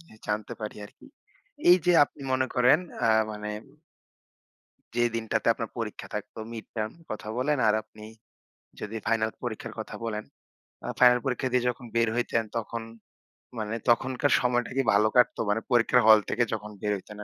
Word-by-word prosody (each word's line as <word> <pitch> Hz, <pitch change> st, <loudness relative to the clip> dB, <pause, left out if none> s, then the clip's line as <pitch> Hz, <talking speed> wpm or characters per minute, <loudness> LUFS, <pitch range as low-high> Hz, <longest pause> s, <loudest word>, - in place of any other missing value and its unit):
জিনিস 165 Hz, -10 st, -18 dB
জানতে 105 Hz, 0 st, -2 dB
পারি 105 Hz, -1 st, -5 dB
আরকি। -, -, -19 dB, 0.6 s
এইযে 180 Hz, 0 st, +5 dB
আপনি -, -, -19 dB
মনে 130 Hz, 0 st, +2 dB
করেন 125 Hz, +5 st, +5 dB, 0.3 s
আ -, -, +3 dB, 0.2 s
মানে 105 Hz, 0 st, -5 dB, 1.4 s
যে 120 Hz, -, +2 dB
দিনটাতে 110 Hz, -1 st, -2 dB
আপনার -, -, -5 dB
পরীক্ষা -, -, -5 dB
থাকতো -, -, -6 dB
mid-term 110 Hz, -1 st, -5 dB, 0.2 s
কথা 110 Hz, 0 st, -6 dB
বলেন 145 Hz, +2 st, +1 dB
আর 105 Hz, -, +4 dB
আপনি 110 Hz, 0 st, -15 dB, 0.8 s
যদি 105 Hz, +1 st, -5 dB
ফাইনাল 110 Hz, -1 st, +1 dB
পরীক্ষার 120 Hz, -3 st, -5 dB
কথা -, -, -6 dB
বলেন। 110 Hz, -2 st, -3 dB, 0.6 s
আ -, -, -4 dB
ফাইনাল 125 Hz, -1 st, +7 dB
পরীক্ষা 130 Hz, 0 st, -1 dB
দিয়ে 125 Hz, -1 st, +2 dB
যখন 125 Hz, 0 st, -6 dB
বের 115 Hz, -1 st, +3 dB
হইতেন 115 Hz, -1 st, 0 dB
তখন 115 Hz, 0 st, -4 dB, 0.8 s
মানে 110 Hz, 0 st, -3 dB
তখনকার 130 Hz, +3 st, +2 dB
সময়টা 120 Hz, -1 st, 0 dB
কি -, -, +4 dB
ভালো 105 Hz, +2 st, +4 dB
কাটতো? 125 Hz, -, +4 dB
মানে 110 Hz, +2 st, +1 dB
পরীক্ষার 120 Hz, +1 st, +4 dB
হল 110 Hz, -1 st, +9 dB
থেকে 120 Hz, -, +2 dB
যখন 105 Hz, -1 st, -5 dB
বের 105 Hz, -1 st, 0 dB
হইতেন 105 Hz, +2 st, -12 dB
115 Hz, 160 wpm, -27 LUFS, 110-125 Hz, 1.4 s, হল